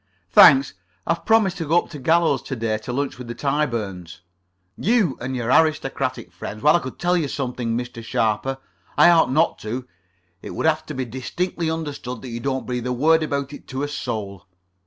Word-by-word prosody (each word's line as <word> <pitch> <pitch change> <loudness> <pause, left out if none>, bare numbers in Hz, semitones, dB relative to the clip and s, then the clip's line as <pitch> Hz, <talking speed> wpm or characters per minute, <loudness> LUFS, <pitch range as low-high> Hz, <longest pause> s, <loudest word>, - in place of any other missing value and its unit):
"Thanks. 135 +5 +7 0.3
I - - +2
have 170 - -10
promised 215 -5 +3
to 165 -3 -4
go 165 +3 +3
up - - -18
to 150 - -7
Gallows 160 -1 +2
to 135 - -5
day 110 -2 -1
to 125 +4 -6
lunch 135 0 -3
with 125 - -8
the 120 - -6
Tyburns." 110 - -2 0.5
"You 210 - +2
and 130 +2 -3
your 120 -1 -1
aristocratic 135 - +1
friends. 100 +5 -8
Well, 150 +2 +6
I - - +4
could 130 -6 -8
tell 175 +1 +1
you 165 -5 0
something, 125 -4 -3
Mr. 120 -1 -6
Sharper. 110 +4 0 0.4
I 175 - +7
ought 165 -5 +4
not 155 +5 +2
to. 125 +4 -5 0.5
It - - -8
would - - -2
have 155 0 +1
to 150 - -6
be 130 0 -2
distinctly 160 +8 -3
understood 145 -7 -5
that 130 - -7
you 115 0 -5
don't 130 +1 -2
breathe 125 -1 -3
a - - -1
word 160 +6 +3
about 140 -2 -2
it - - -11
to 130 +1 -4
a - - -1
soul." 100 -9 -5
135 Hz, 205 wpm, -22 LUFS, 120-155 Hz, 0.5 s, Thanks